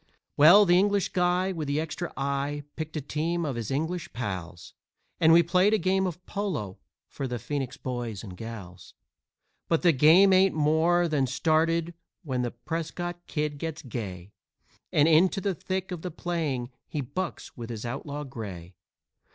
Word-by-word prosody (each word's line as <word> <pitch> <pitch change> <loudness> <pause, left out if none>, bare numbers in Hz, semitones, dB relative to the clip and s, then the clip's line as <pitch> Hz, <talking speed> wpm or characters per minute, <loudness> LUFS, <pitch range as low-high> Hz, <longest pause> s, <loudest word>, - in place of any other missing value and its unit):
"Well, 175 +8 +8
the 175 -1 +5
English 200 -1 +2
guy 180 +1 +1
with 160 -5 -4
the 140 +2 0
extra 165 +2 -4
eye 140 +1 -2
picked 155 0 -5
a - - -2
team 165 +4 -2
of 140 -4 -2
his 115 -2 -4
English 160 +4 -2
pals, 95 -7 -5 0.5
And 160 0 +6
we 170 +1 +7
played 185 +5 +3
a - - +3
game 190 0 +1
of 180 0 -7
polo 170 - -3 0.3
for 135 - -5
the 125 -1 -3
Phoenix 135 +2 -4
boys 120 -5 -4
and 95 -4 -8
gals. 95 -5 -9 0.7
But 165 +1 +1
the 175 - +6
game 165 +7 +6
ain't 190 -1 +4
more 160 +3 +3
than 145 -5 +1
started 165 +5 +1 0.3
when 130 -6 -2
the 120 - -1
Prescott 170 +6 -5
Kid 150 -2 -2
gets 160 0 -5
gay 100 -7 -6 0.6
And 150 +1 +4
into 175 +5 +4
the 195 0 -1
thick 185 +3 -4
of 175 -3 -5
the 180 - -4
playing 155 -8 -3 0.2
he 150 - -3
bucks 165 +8 -5
with 120 -2 -7
his 115 -1 -5
outlaw 140 +4 -4
gray. 100 - -8
155 Hz, 170 wpm, -27 LUFS, 125-175 Hz, 0.7 s, Well